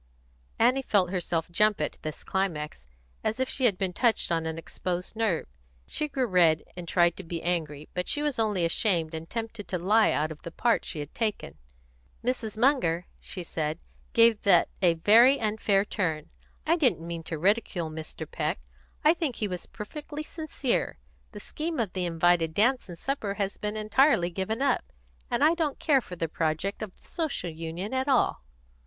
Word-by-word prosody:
Annie 250 Hz, +4 st, +4 dB
felt 195 Hz, -8 st, +2 dB
herself 170 Hz, -3 st, -1 dB
jump 210 Hz, +3 st, +3 dB
at 150 Hz, -, -3 dB
this 155 Hz, -1 st, -6 dB
climax, 150 Hz, -, -2 dB, 0.4 s
as 220 Hz, +3 st, -1 dB
if 260 Hz, -, +1 dB
she 260 Hz, -, 0 dB
had 205 Hz, -6 st, +3 dB
been 190 Hz, -2 st, -1 dB
touched 235 Hz, -5 st, +1 dB
on 165 Hz, -1 st, 0 dB
an 160 Hz, 0 st, -4 dB
exposed 180 Hz, +3 st, -4 dB
nerve. 220 Hz, -7 st, 0 dB, 0.4 s
She 300 Hz, -, -2 dB
grew 270 Hz, -3 st, -1 dB
red, 175 Hz, -6 st, +4 dB
and 175 Hz, -1 st, -7 dB
tried 175 Hz, -1 st, +3 dB
to 195 Hz, -, -7 dB
be 165 Hz, -1 st, -5 dB
angry, 155 Hz, -4 st, -2 dB
but 180 Hz, 0 st, -2 dB
she 295 Hz, -, 0 dB
was 295 Hz, -5 st, -1 dB
only 205 Hz, -6 st, +1 dB
ashamed 165 Hz, -2 st, +1 dB
and 160 Hz, +1 st, -6 dB
tempted 225 Hz, -2 st, -5 dB
to 185 Hz, -, -1 dB
lie 210 Hz, +5 st, +4 dB
out 155 Hz, +1 st, 0 dB
of 155 Hz, -, -9 dB
the -, -, -7 dB
part 235 Hz, +7 st, +1 dB
she 165 Hz, -, -4 dB
had 145 Hz, -, -8 dB
taken. 215 Hz, -, -2 dB, 0.7 s
"Mrs. 230 Hz, -4 st, -1 dB
Munger," 220 Hz, -, +2 dB
she 180 Hz, -, -7 dB
said, 155 Hz, -1 st, -2 dB, 0.4 s
"gave 230 Hz, -3 st, +5 dB
that 180 Hz, -4 st, +5 dB
a 175 Hz, -3 st, +4 dB
very 230 Hz, +10 st, +6 dB
unfair 210 Hz, -2 st, +1 dB
turn. 160 Hz, -8 st, -2 dB, 0.3 s
I 330 Hz, +2 st, +3 dB
didn't 250 Hz, -, +2 dB
mean 170 Hz, -1 st, -4 dB
to 165 Hz, -, -4 dB
ridicule 185 Hz, -2 st, +1 dB
Mr. 155 Hz, 0 st, -6 dB
Peck. -, -, -2 dB, 0.5 s
I 310 Hz, -, +7 dB
think 320 Hz, -8 st, -2 dB
he 210 Hz, -, -1 dB
was 180 Hz, -2 st, -6 dB
perfectly 295 Hz, +7 st, -7 dB
sincere. 305 Hz, -5 st, -2 dB, 0.3 s
The 210 Hz, -, -8 dB
scheme 315 Hz, +8 st, -4 dB
of 215 Hz, -6 st, -1 dB
the 185 Hz, -2 st, -1 dB
invited 165 Hz, -1 st, +2 dB
dance 245 Hz, +1 st, +2 dB
and 175 Hz, -, -7 dB
supper 215 Hz, -4 st, -2 dB
has 200 Hz, -1 st, -2 dB
been 210 Hz, +1 st, -3 dB
entirely 215 Hz, -, +3 dB
given 220 Hz, +8 st, -2 dB
up. 275 Hz, -3 st, +2 dB, 0.5 s
And -, -, +1 dB
I 315 Hz, -, +6 dB
don't 320 Hz, -5 st, -1 dB
care 280 Hz, -4 st, +3 dB
for 185 Hz, -, -9 dB
the 165 Hz, -1 st, -2 dB
project 160 Hz, +5 st, -2 dB
of 210 Hz, -4 st, -6 dB
the -, -, -23 dB
Social 310 Hz, -, -2 dB
Union 165 Hz, +7 st, -5 dB
at 260 Hz, +1 st, 0 dB
all." 260 Hz, -, +2 dB
195 Hz, 185 wpm, -28 LUFS, 170-235 Hz, 0.7 s, I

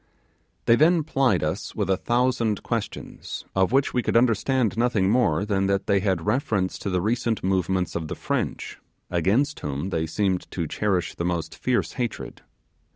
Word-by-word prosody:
Then 155 Hz, +9 st, +5 dB
they 160 Hz, -, 0 dB
plied 135 Hz, -, +1 dB
us 75 Hz, +1 st, -3 dB
with -, -, -1 dB
a 95 Hz, -, +3 dB
thousand 120 Hz, 0 st, 0 dB
questions, -, -, -5 dB
of 95 Hz, +1 st, +2 dB
which 135 Hz, +1 st, +2 dB
we 125 Hz, -, +2 dB
could 115 Hz, -, +1 dB
understand 120 Hz, 0 st, +2 dB
nothing 115 Hz, -5 st, +2 dB
more 105 Hz, -7 st, +2 dB
than 95 Hz, -2 st, +1 dB
that 100 Hz, 0 st, 0 dB
they 100 Hz, -1 st, +3 dB
had 95 Hz, -4 st, -1 dB
reference 105 Hz, -5 st, 0 dB
to -, -, -3 dB
the 90 Hz, -1 st, +1 dB
recent 115 Hz, +3 st, -1 dB
movements 95 Hz, -1 st, 0 dB
of 80 Hz, -2 st, -3 dB
the -, -, -4 dB
French, -, -, -3 dB, 0.3 s
against 110 Hz, -, +1 dB
whom 75 Hz, +6 st, -4 dB
they 80 Hz, -2 st, -1 dB
seemed 95 Hz, +1 st, -1 dB
to 85 Hz, -, -3 dB
cherish 95 Hz, +3 st, -1 dB
the -, -, -4 dB
most 85 Hz, -3 st, -2 dB
fierce 125 Hz, -1 st, 0 dB
hatred. 120 Hz, -3 st, -4 dB
100 Hz, 170 wpm, -25 LUFS, 90-120 Hz, 0.3 s, Then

